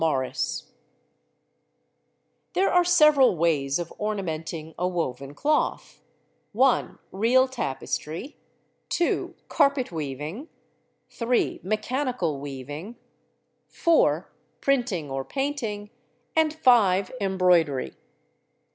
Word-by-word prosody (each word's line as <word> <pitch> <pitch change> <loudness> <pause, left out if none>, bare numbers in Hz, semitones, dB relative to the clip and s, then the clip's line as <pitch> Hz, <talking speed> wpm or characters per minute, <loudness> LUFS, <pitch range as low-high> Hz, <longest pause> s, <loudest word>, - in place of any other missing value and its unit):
TEXTILES 135 -5 -1 1.9
There 385 - +2
are 355 0 +5
several 305 - +5
ways 145 -4 +1
of 175 -1 -5
ornamenting 165 -6 -4
a 180 - +1
woven 140 -6 -3
cloth: 300 - -1 0.5
(1) 255 +4 +2
real 240 +7 +3
tapestry, 200 - -4 0.5
(2) 345 - 0
carpet 280 - +2
weaving, 155 - -5 0.6
(3) 240 +1 0
mechanical 215 - -1
weaving, 145 - -7 0.7
(4) 335 -2 +2 0.3
printing 240 - 0
or 135 0 -2
painting, 225 - -3 0.4
and 320 -1 +3
(5) 210 -11 +3
embroidery. 180 -8 +2
195 Hz, 85 wpm, -25 LUFS, 155-260 Hz, 1.9 s, are